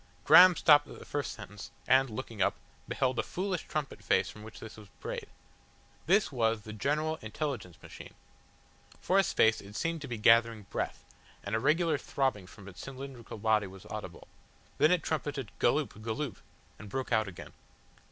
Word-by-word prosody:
Graham 180 0 +9
stopped 145 -3 +5
at - - -11
the - - -12
first 145 -1 -3
sentence, 105 -1 -9 0.2
and, 135 0 +5
looking 115 -2 -6
up, - - +2 0.3
beheld 130 -2 0
a - - +4
foolish 185 -1 -3
trumpet 150 -3 -4
face - - +2
from 105 - -13
which 110 +1 -11
this 110 - -9
was 110 -1 -13
brayed. - - -5 0.8
This 195 +2 +3
was 115 -4 +1
the 110 - -8
General 150 +8 -1
Intelligence 110 - -4
Machine. - - -11 0.8
For 190 +2 +2
a - - +5
space 110 -10 +3
it 100 +1 -12
seemed 165 +2 -2
to 140 - -6
be 120 -3 -4
gathering 115 0 +4
breath, - - -3 0.4
and 100 - -5
a 110 - +2
regular 160 +3 +2
throbbing 130 -9 -1
from 100 0 -14
its 95 - -10
cylindrical 135 -4 -8
body 110 -1 +2
was 95 0 -13
audible. - - -7 0.5
Then 155 - +6
it 180 -3 +2
trumpeted 145 -6 -3
"Galloop, 120 -4 +1
Galloop," 115 +2 -3 0.4
and 105 - -10
broke 130 +5 -4
out 110 -2 +2
again. 95 - -10
125 Hz, 175 wpm, -31 LUFS, 110-150 Hz, 0.8 s, Graham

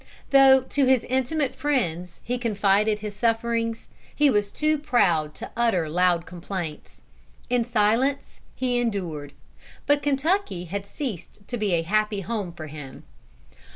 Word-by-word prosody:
Though 270 -1 +7
to 270 +2 0
his 255 -2 +3
intimate 265 +2 -1
friends 180 - -2
he 245 +2 -2
confided 210 -2 +2
his 210 -1 -7
sufferings, 230 0 -1 0.3
he 295 -2 +4
was 205 -2 +1
too 305 0 +1
proud 175 - +1
to - - -8
utter 230 -9 +1
loud 175 +1 +2
complaints. 175 -3 -7 0.5
In 245 -1 +3
silence 235 +5 0 0.2
he 250 -1 0
endured. 175 -11 -3 0.5
But 290 0 +3
Kentucky 290 - 0
had 200 +3 -5
ceased 200 - -7
to 245 - -4
be 210 -5 0
a 165 -1 +2
happy 210 +3 0
home 205 -3 -3
for 165 -2 -8
him. 145 -3 -10
215 Hz, 140 wpm, -25 LUFS, 180-260 Hz, 0.5 s, Though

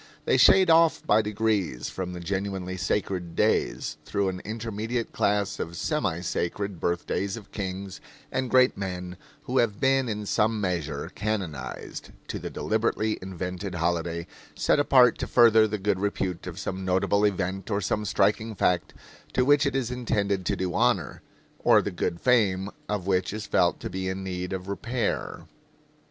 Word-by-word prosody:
They - - +3
shade 190 -3 +6
off 165 0 +4
by 105 +1 +4
degrees 105 - -1
from 90 -1 -5
the 90 - -6
genuinely 95 0 -3
sacred 90 -2 -2
days, - - +1
through 100 -1 0
an 90 -1 -5
intermediate 115 +2 -3
class 100 0 0
of 85 0 -4
semi 100 - -1
sacred 90 +2 -2
birthdays 95 +4 -1
of 105 -3 -12
kings 95 -1 -5 0.3
and 130 -1 -1
great 130 0 +5
men 90 -2 -5 0.3
who 130 -2 0
have 105 -4 +1
been 135 -2 +2
in 105 -1 -3
some 110 +1 +1
measure 85 -7 -2
canonized, 100 -8 -4 0.2
to - - -3
the - - -5
deliberately 110 0 0
invented 90 0 -5
holiday 85 0 -1 0.3
set - - +2
apart 130 -4 +5
to - - -2
further 110 -2 +6
the 105 0 -2
good 100 -1 0
repute 95 -3 -2
of 90 -1 -6
some 95 0 -4
notable 95 +2 +2
event 95 -1 -1
or 100 -2 +1
some 105 +1 -1
striking 105 +2 +1
fact, 90 -2 0 0.4
to 125 - +2
which 145 +1 +4
it 135 - -2
is 125 -3 -1
intended 100 -6 -1
to - - +1
do 90 -1 -2
honor, - - +1 0.4
or - - +5
the - - -2
good 85 - -2
fame 100 -6 +2 0.2
of 105 -4 -2
which 95 -1 +1
is 105 0 -5
felt - - +2
to - - -5
be 95 0 -3
in 95 +1 -4
need 90 -1 -4
of 95 0 -4
repair. 115 +5 -2
100 Hz, 165 wpm, -26 LUFS, 90-110 Hz, 0.4 s, shade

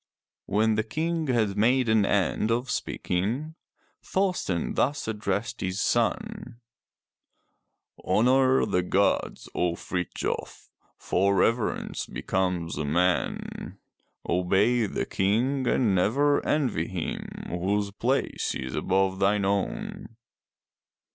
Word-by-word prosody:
When 110 +2 +2
the 110 0 +1
King 160 +6 -2
had 110 -6 +1
made 125 +4 +3
an 110 -2 +3
end 100 +2 +1
of 120 +2 0
speaking 120 - -2 0.5
Thorsten 180 - -1
thus 145 0 0
addressed 105 0 -2
his 95 +1 -2
son: 120 +3 -1 1.4
"Honor 130 +3 +3
the 90 - +1
gods, 95 +3 0
O 90 -1 0
Frithjof, 90 0 -4 0.3
for 100 +2 +1
reverence 115 +4 0
becomes 90 -3 -2
a - - -1
man. 90 +5 -1 0.5
Obey 100 +6 +2
the - - -2
King 125 +7 0
and 115 -6 +2
never 135 +11 +2
envy 125 - +1
him 90 -4 -4 0.2
whose 100 +4 -1
place 125 +6 -1
is 65 -1 -5
above 95 0 +1
thine 100 0 +2
own. 100 +3 -2
105 Hz, 105 wpm, -27 LUFS, 95-125 Hz, 1.4 s, made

